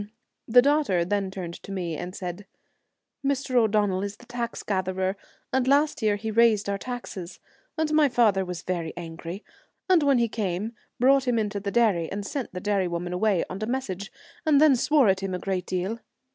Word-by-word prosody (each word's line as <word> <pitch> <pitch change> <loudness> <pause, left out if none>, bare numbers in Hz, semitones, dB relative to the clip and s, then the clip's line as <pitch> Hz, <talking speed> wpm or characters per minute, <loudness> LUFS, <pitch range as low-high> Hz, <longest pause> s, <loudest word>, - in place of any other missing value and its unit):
The 245 +2 +6
daughter 280 - +2
then 200 +1 -1
turned 180 -3 -7
to - - -10
me 175 -4 -3
and 180 +4 -6
said, 180 +2 -6 0.4
' - - -56
Mr. 275 -1 -1
O'Donnell 210 -5 +3
is 200 +1 -4
the 245 - -16
tax 240 -1 -4
gatherer, 190 -1 -1 0.4
and 260 -1 +2
last 285 +2 +3
year 215 -2 +2
he 220 +2 -4
raised 220 -2 +4
our 200 0 -1
taxes, 220 -8 -7 0.4
and 315 -1 0
my 305 -2 +5
father 215 -6 +3
was 180 -2 -6
very 170 -3 -3
angry, 170 +3 -7 0.4
and 370 -3 +5
when 280 -2 +4
he 235 -1 +2
came, 210 0 -3 0.3
brought 265 +2 +4
him 245 -1 +2
into 210 -2 -1
the 200 0 -3
dairy, 200 -8 +2
and 200 +1 -4
sent 270 +3 -4
the 180 - -5
dairy 200 -1 0
woman 175 +1 -3
away 190 -1 +1
on 195 - -7
a 215 - -2
mes 260 +2 -1
sage, 190 +2 -6 0.3
and 305 -3 +4
then 300 -3 +6
swore 280 0 +3
at 190 -1 +3
him 190 -1 -2
a - - -1
great 185 -1 -3
deal. 185 +5 -2
205 Hz, 200 wpm, -26 LUFS, 185-245 Hz, 0.4 s, The